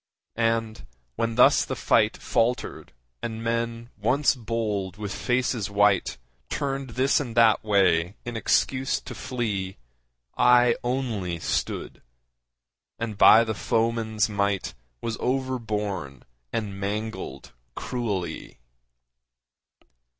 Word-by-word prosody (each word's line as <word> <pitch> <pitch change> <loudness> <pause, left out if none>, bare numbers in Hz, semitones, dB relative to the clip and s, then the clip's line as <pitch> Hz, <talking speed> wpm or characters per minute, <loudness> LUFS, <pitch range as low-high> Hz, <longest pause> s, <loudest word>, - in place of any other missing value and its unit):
And, 115 -1 -1 0.3
when 115 - -1
thus 125 - +6
the - - -4
fight - - +2
Faltered 120 +2 -1 0.3
and 115 -1 -4
men 115 0 -2
once 130 +7 +3
bold 105 -5 -3
with 105 -2 -4
faces 125 -4 0
white 100 -8 +2 0.3
Turned 135 -2 -3
this 135 +2 +3
and 120 -5 -5
that 115 -2 +5
way 95 -4 +2
in 120 -1 -5
excuse 130 +3 +1
to - - -8
flee, 100 -7 -3 0.6
I 125 -1 +5
only 120 -9 -2
stood, - - -3 1.0
and 115 -2 -4
by 110 +2 +8
the 110 -1 -2
foeman's 110 0 0
might 100 -2 -1 0.3
Was 115 -1 -3
overborne 105 - -2 0.3
and 100 -3 -3
mangled 105 0 -4 0.2
cruelly. 100 -10 -4
115 Hz, 105 wpm, -25 LUFS, 100-120 Hz, 1.0 s, by